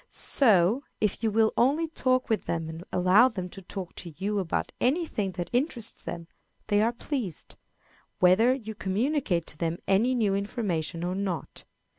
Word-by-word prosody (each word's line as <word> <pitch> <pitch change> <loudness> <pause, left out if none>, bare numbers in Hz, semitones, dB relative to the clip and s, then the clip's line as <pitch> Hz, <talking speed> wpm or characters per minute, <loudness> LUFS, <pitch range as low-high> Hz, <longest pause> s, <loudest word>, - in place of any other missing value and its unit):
So, 215 -2 +3 0.2
if 210 -2 0
you 225 - +2
will 220 +1 +3
only 290 +7 +2
talk 255 -5 0
with 220 -2 0
them 165 -1 -2
and 160 +1 -7
allow 185 +8 +5
them 185 -6 -5
to 195 - -10
talk 185 -1 -7
to 170 -4 -8
you 205 +3 -1
about 180 -4 -2
any 315 +8 +2
thing 200 - -3
that 175 -1 -5
interests 245 -3 -1
them, 170 -1 -6 0.4
they 205 -1 +3
are 225 +2 +3
pleased, 240 - -5 0.6
whether 185 +7 +5
you 225 -5 -3
communicate 205 - 0
to 150 - -10
them 165 0 -1
any 225 +7 +3
new 215 -5 +2
information 195 -5 -2
or 180 +1 -1
not. 190 -3 -4
205 Hz, 170 wpm, -27 LUFS, 180-240 Hz, 0.6 s, allow